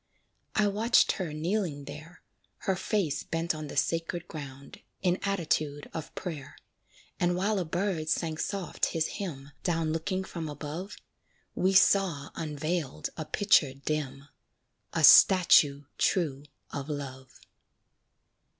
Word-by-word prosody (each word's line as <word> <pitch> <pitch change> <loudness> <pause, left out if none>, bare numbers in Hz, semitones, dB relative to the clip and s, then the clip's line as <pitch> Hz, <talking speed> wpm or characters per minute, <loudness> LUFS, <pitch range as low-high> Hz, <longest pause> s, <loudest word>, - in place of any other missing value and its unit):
I 210 -1 +3
watched 220 +4 +3
her 180 -5 -3
kneeling 160 -2 -2
there, 155 +5 -11 0.4
Her 190 - 0
face 185 -4 -1
bent 165 +1 -2
on 155 -1 -6
the 140 - -8
sacred 165 +4 -1
ground, 140 -3 -9 0.2
In 180 0 +2
attitude 155 -7 -1
of 160 -1 -7
prayer; 155 -7 -6 0.6
And 175 0 +2
while 200 +3 +1
a 180 - -2
bird 170 -1 -2
sang 160 -1 -1
soft 195 -3 -1
his 160 -1 0
hymn, 145 -9 -6
Down 165 -3 0
looking 185 +4 -2
from 165 -4 -6
above, 155 +7 -6 0.6
We 190 +1 +1
saw 185 -7 +3
unveiled 155 - -3
a 155 - -5
picture 155 -5 +3
dim 140 -1 -4 0.6
A - - -1
statue 150 -6 +7 0.2
true 145 -6 +1 0.3
of 140 +1 -5
love. 130 -3 -7
160 Hz, 125 wpm, -29 LUFS, 145-185 Hz, 0.6 s, statue